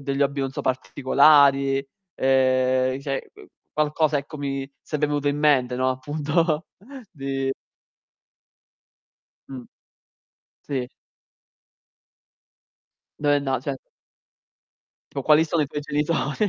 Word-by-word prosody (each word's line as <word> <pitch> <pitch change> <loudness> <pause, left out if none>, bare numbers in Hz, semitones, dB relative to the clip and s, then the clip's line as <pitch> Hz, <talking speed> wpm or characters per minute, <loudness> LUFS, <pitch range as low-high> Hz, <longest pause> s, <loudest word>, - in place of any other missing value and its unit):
degli 140 0 -1
hobby 140 0 0
non 135 - -1
so - - -5
particolari, 135 +1 +3 0.3
uhm, 130 -1 +2
i 135 - -7
cioè 135 -2 -4
uhm, - - -15 0.3
qualcosa, 155 0 +1
ecco, 145 +2 -6
mi 135 -1 -3
sarebbe 150 -1 -2
venuto 145 -1 -1
in 145 - 0
mente, 130 -5 +2
no, 130 0 +1
appunto, 150 +4 -1 0.5
di 135 -2 -2 2.0
Mh. 130 -2 -8 1.0
Sì. 130 -3 -4 2.3
Beh, 145 -1 +2
no, 135 -3 -1
cioè 135 0 -4 1.4
Tipo: 140 - -4
"Quali 155 +3 +5
sono 160 -1 0
i - - -2
tuoi 145 +2 -5
genitori." 150 +6 -1
140 Hz, 110 wpm, -24 LUFS, 135-150 Hz, 2.3 s, Quali